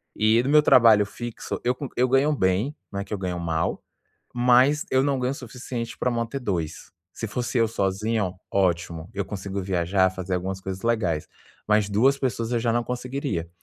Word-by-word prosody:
E 110 +2 +4
do 135 - -1
meu 150 0 +6
trabalho 110 -7 +6
fixo, 120 +2 -6
eu 125 +1 +1
co 135 -1 -6
eu 125 +1 +3
ganho 140 +3 +3
bem, 100 +7 +1 0.2
não 100 - -3
é - - -3
que - - -7
eu 105 - -1
ganho 90 -2 -3
mal, 80 -1 -1 0.5
mas 125 +5 +4
eu 130 0 +3
não 140 -2 +1
ganho 125 +1 0
o - - -4
suficiente 120 -2 -6
pra 125 - +1
manter 120 +3 -2
2. 85 -7 -3 0.2
Se 115 - -5
fosse 125 +2 -2
eu 115 -1 +3
sozinho, 100 -1 -1 0.2
ótimo. 85 -3 0
Eu 100 -1 -2
consigo 100 0 -5
viajar, 95 +1 +1
fazer 95 0 -4
algumas 95 +1 -3
coisas 95 0 -6
legais, 100 -10 0 0.4
mas, 105 -1 +3
2 130 +7 +3
pessoas, 115 -3 -2
eu 120 - +2
já 115 0 +1
não 120 +1 +1
conseguiria. 125 - -3
110 Hz, 195 wpm, -25 LUFS, 95-125 Hz, 0.5 s, meu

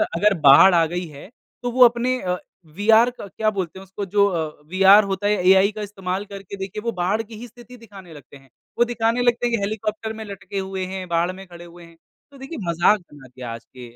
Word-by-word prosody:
अगर 210 +4 +3
बाढ़ 145 +7 +8
आ 165 -1 +4
गई 175 +2 -4
है 150 +3 -13 0.3
तो 245 - -2
वो 250 +1 +6
अपने 245 +2 +1
अ, 180 -1 -2 0.3
वीआर 220 +9 +3
क 200 - -8
क्या 215 -1 +2
बोलते 190 -3 -5
हैं - - -11
इसको 195 +2 -6
जो 200 +1 +2
अ, 160 -5 -4
वीआर 195 +3 +6
होता 195 +2 -2
है 210 - +3
एआई 190 +2 +5
का 215 0 -8
इस्तेमाल 195 -1 -4
करके 200 -1 -9
देखिए 195 +2 -6
वो 235 - 0
बाढ़ 200 +5 0
की 225 0 -13
ही 240 - -8
स्थिति 245 +1 -15
दिखाने 195 -6 -14
लगते 140 -2 -14
हैं 135 -1 -23 0.3
वो 240 - +4
दिखाने 235 0 -1
लगते 240 0 +1
हैं 235 -2 -1
हेलीकॉप्टर 215 +2 -3
में 220 0 -8
लटके 200 -1 -7
हुए 190 -1 -4
हैं 185 -1 -6
बाढ़ 170 +2 0
में 190 +1 -11
खड़े 175 -1 -12
हुए 170 0 -14
हैं, 170 0 -19 0.3
तो 275 - -15
देखिए 270 +5 -8
मज़ाक 170 +5 +3
बना 145 -6 -17
दिया 125 0 -10
है 115 - -5
आज 115 0 -13
के 120 -1 -13
195 Hz, 235 wpm, -21 LUFS, 175-220 Hz, 0.3 s, बाढ़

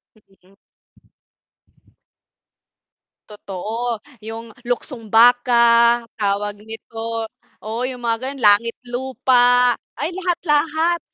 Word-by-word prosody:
Mm. 195 -2 -27 2.8
Totoo. 215 +3 -5 0.2
'Yong 225 +1 -7 0.2
luksong 245 -2 -4
baka, 235 0 +5 0.2
tawag 205 0 -1
nito 225 +1 -6 0.4
oo, 225 +3 -4
'yong 250 -2 -7
mga 230 -1 0
gano'n. 275 -2 -7
Langit 210 +3 +4 0.2
lupa. 245 -1 +3 0.2
Ay 335 - -3
lahat 355 -1 -2
lahat 320 +2 +1
235 Hz, 85 wpm, -20 LUFS, 220-250 Hz, 2.8 s, baka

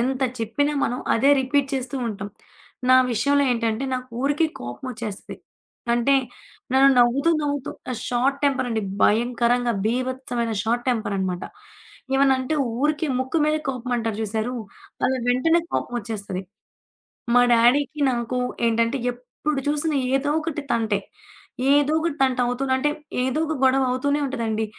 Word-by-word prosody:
ఎంత 260 +2 0 0.2
చెప్పినా 255 +7 0
మనం 245 - -2 0.2
అదే 270 +5 +4
రిపీట్ 275 +1 +1
చేస్తూ 260 0 -3
ఉంటాం. 205 -2 -5 0.6
నా 255 - +8 0.2
విషయంలో 280 +6 +2
ఏంటంటే, 230 +1 -1
నాకు 255 0 -5
ఊరికే 290 +3 +2
కోపమొచ్చేస్తది. 215 - -6 0.6
అంటే, 240 +4 +3 0.6
నన్ను 270 +1 +6
నవ్వుతూ, 245 +6 +4
నవ్వుతూ 285 -2 -2 0.2
ఆహ్, 230 - -5
షార్ట్ 260 +3 +1
టెంపరండి 245 -5 0 0.2
భయంకరంగా. 240 +2 +2
భీభత్సమైన 250 -1 -2
షార్ట్ 235 +2 -1
టెంపరనమాట. 195 -6 -2 0.7
ఏమన్నంటే 270 +1 +2 0.3
ఊరికే 300 +2 +1
ముక్కు 260 +4 -2
మీదే 305 0 +1
కోపమంటారు 245 -4 -2
జూశారు, 220 +3 -2 0.5
అలా 260 - +2
వెంటనే 325 +8 +3
కోపమొచ్చేస్తది. 205 -5 -3 0.9
మా 245 - +7
డ్యాడీకి, 270 +6 +3
నాకు, 240 0 -2 0.3
ఏంటంటే 230 +3 +1 0.2
ఎప్పుడు 270 +4 -4
చూసిన 300 +1 0 0.2
ఏదోకటి 300 +2 -1
తంటే. 220 -3 +1 0.7
ఏదోకటి 305 +2 +2
తంటవుతూ 250 0 0
అంటే, 260 +3 +1 0.3
ఏదో 260 +4 0
ఒక 315 - -2
గొడవ 265 +1 +4
అవుతూనే 285 +3 0
ఉంటదండి. 225 -5 -2
255 Hz, 120 wpm, -23 LUFS, 230-280 Hz, 0.9 s, నా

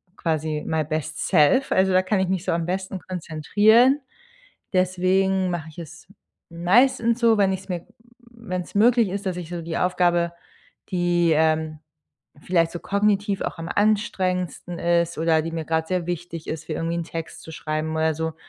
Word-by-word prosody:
quasi 155 -2 -2
my 160 -1 0
best 155 0 -3
self, 180 - +4
also, 190 0 +3
da 185 - +5
kann 190 +1 0
ich 190 -1 0
mich 190 -1 -1
so - - 0
am 170 -1 -1
besten 190 +1 -3
konzentrieren. 205 - +3 0.7
Deswegen 185 +1 +2
mache 165 -2 -4
ich 155 - -19
es 170 +1 -10 0.4
meistens 235 +7 +2
so, 230 -2 +4
wenn 195 -1 +3
ich 190 - -3
es 190 - -17
mir 175 -2 -3
w - - -28 0.5
wenn 185 -6 -4
es - - -15
möglich 230 +1 +4
ist, 200 +2 -5
dass 185 - -1
ich 170 -2 -7
so 175 -1 -5
die 165 0 -3
Aufgabe, 175 -1 +1 0.6
die, 175 -2 +2
ähm, 155 0 +1 0.6
vielleicht 170 -1 +1
so 175 - -6
kognitiv 200 0 0
auch - - -3
am 165 - -5
anstrengendsten 185 -5 0
ist 170 -1 +1
oder 160 0 +2
die 165 +1 -5
mir 165 -1 -4
grad 160 0 -1
sehr 180 -2 -1
wichtig 170 -2 -5
ist, 160 0 -5
wie 155 - -1
irgendwie 165 +2 -2
einen 170 - -2
Text 165 0 -7
zu 160 - -11
schreiben 155 0 -3
oder 160 0 +1
so. 160 0 -3
175 Hz, 185 wpm, -23 LUFS, 160-190 Hz, 0.7 s, da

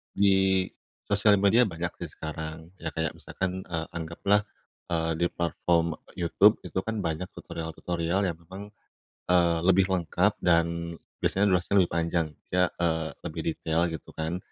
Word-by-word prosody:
Di 95 -1 +4 0.4
sosial 100 +1 +4
media 110 +4 +5
banyak 85 0 -3
sih 80 - -6
sekarang, 80 +1 -6
ya 80 -1 -4
kayak 80 -1 -1
misalkan, 95 +3 -4
eee, 80 -2 -4
anggaplah, 85 +5 +1 0.5
eee, 80 -1 +1
di 85 - +3
platform 85 -1 +1 0.2
YouTube 100 +5 +4
itu 95 - -2
kan 110 -1 -3
banyak 80 +2 -2
tutorial-tutorial 85 +3 -2
yang 85 -2 -3
memang, 95 +5 -10 0.6
eee, 85 -2 +4
lebih 95 0 +5
lengkap 90 -4 +1
dan 85 -1 +1 0.3
biasanya 100 +1 +2
durasinya 90 +2 +2
lebih 85 - -1
panjang 85 -1 +1 0.3
ya, 90 -1 +4
eee, 80 -2 0 0.2
lebih - - -4
detail 85 +1 0
gitu 80 -1 -7
kan, 80 +3 -2
85 Hz, 145 wpm, -28 LUFS, 80-95 Hz, 0.6 s, media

